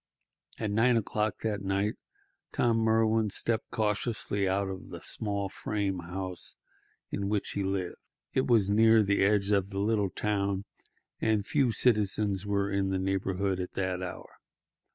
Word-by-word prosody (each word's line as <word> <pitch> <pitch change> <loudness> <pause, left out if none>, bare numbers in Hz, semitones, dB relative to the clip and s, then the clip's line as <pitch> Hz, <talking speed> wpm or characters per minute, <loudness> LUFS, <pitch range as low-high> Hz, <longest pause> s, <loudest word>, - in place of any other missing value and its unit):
At 110 -2 -2
nine 115 +3 +4
o'clock 105 -2 -1
that 105 -3 -1
night 100 +2 0 0.6
Tom 115 -1 +2
Merwin 110 -1 +3
stepped 110 +3 0
cautiously 105 -2 -1
out 95 +1 +1
of 95 -1 -7
the - - -7
small 100 -2 -2
frame 100 -1 -2
house 90 +1 -4 0.6
in 100 0 -2
which 105 -1 0
he 100 - -1
lived. 95 -2 -2 0.4
It 130 - +1
was 115 -5 +4
near 110 +2 +5
the 100 -1 +2
edge 100 0 +2
of 100 -1 +2
the 100 - -6
little 105 -1 +1
town, 100 -1 -1 0.5
and 110 -2 +1
few 135 -2 +2
citizens 105 -4 +1
were 100 0 0
in 100 -1 +1
the 95 - 0
neighbourhood 95 0 -1
at 90 - -4
that 95 -1 -2
hour. 90 -1 -8
100 Hz, 155 wpm, -29 LUFS, 95-110 Hz, 0.6 s, near